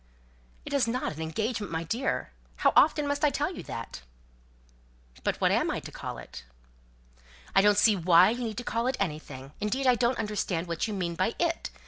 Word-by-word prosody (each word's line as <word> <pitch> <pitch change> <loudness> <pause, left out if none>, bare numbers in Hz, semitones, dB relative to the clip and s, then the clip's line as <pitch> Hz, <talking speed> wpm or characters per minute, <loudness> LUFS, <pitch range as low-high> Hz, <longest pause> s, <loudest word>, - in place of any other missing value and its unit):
"It - - -6
is 275 -4 +2
not 250 -4 -2
an 155 - -8
engagement, 210 +6 -2
my 165 0 -2
dear! 235 +11 -2 0.2
How - - +2
often 300 -1 +5
must 285 +1 -2
I 300 - +6
tell 290 +6 -1
you - - -6
that?" 115 - -7 1.2
"But - - -1
what - - +3
am - - +2
I - - -1
to - - -10
call - - -6
it?" 60 0 -10 1.1
"I 195 - +7
don't 205 0 +4
see 210 0 +5
why 175 +2 +5
you 245 +1 -3
need 220 -2 -4
to 245 - -3
call 230 +1 -1
it 260 - 0
anything. 150 -6 -4
Indeed, 250 +6 -1
I 255 - +6
don't 240 +1 +1
understand 200 -5 -2
what 170 +3 -2
you 215 - -4
mean 175 -3 -2
by 185 +6 -1
'it.' 335 -1 -1
210 Hz, 200 wpm, -28 LUFS, 170-250 Hz, 1.2 s, I